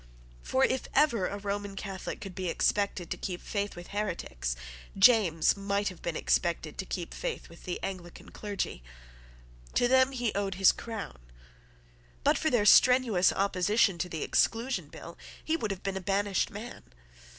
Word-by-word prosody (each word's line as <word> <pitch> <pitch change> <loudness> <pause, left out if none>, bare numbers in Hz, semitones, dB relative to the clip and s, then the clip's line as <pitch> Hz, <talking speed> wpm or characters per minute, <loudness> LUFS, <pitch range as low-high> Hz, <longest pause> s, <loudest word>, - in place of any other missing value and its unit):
For, 265 0 +2
if 260 0 -1
ever 235 -11 +3
a 200 - -4
Roman 200 0 -4
Catholic 195 -1 -6
could 195 - -8
be 185 -1 -3
expected 200 -2 0
to - - -2
keep 180 -2 -4
faith 205 -1 -3
with 175 0 -10
heretics, 170 - -3 0.4
James 195 -7 +5
might 200 +1 -1
have 180 - -12
been 170 -2 -3
expected 165 -2 0
to 190 - -4
keep 175 -3 -4
faith - - -5
with 170 - -15
the 180 - -3
Anglican 175 -3 -7
clergy. 200 - -4 0.9
To 245 - +4
them 260 +1 +4
he 245 -4 -1
owed 195 -1 -2
his 190 0 +6
crown. 220 - -7 1.0
But - - +4
for 315 - +1
their 235 -7 +2
strenuous 240 -6 +6
opposition 195 0 +2
to 180 - -2
the 160 -3 -4
Exclusion 235 +4 +1
Bill - - -11 0.3
he 320 - +1
would 220 -10 -2
have 195 -2 -5
been 195 -1 -2
a - - -4
banished 200 +1 0
man. 220 +4 -8
200 Hz, 165 wpm, -29 LUFS, 180-220 Hz, 1.0 s, his